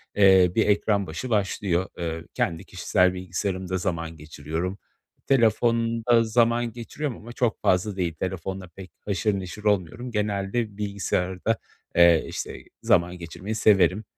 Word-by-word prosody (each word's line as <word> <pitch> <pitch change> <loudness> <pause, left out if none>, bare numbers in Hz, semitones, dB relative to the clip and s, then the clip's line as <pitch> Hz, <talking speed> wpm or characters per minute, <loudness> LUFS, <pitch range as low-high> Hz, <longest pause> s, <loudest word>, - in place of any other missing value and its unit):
eee, 95 -3 +6
bir 110 - +3
ekran 100 -1 +2
başı 85 +11 -5
başlıyor. 100 -3 0
Eee, 80 -1 -4
kendi 85 +2 -1
kişisel 90 0 +1
bilgisayarımda 95 0 -3
zaman 85 -3 -3
geçiriyorum. 80 +5 -5 0.5
Telefonda 115 -1 +3
zaman 115 +1 +2
geçiriyorum 120 +3 -5
ama 120 +2 -11
çok 120 -2 0
fazla 95 +2 +1
değil. 85 -4 -1
Telefonla 95 +2 -4
pek 95 +2 -12
haşır 100 0 0
neşir 95 +3 -8
olmuyorum. 105 +5 0
Genelde 105 0 -1
bilgisayarda, 100 0 -1 0.4
eee, 85 -2 +6
işte, - - -6 0.2
zaman 90 +1 +2
geçirmeyi 90 +5 -6
severim. 105 -1 +4
95 Hz, 125 wpm, -25 LUFS, 90-110 Hz, 0.5 s, eee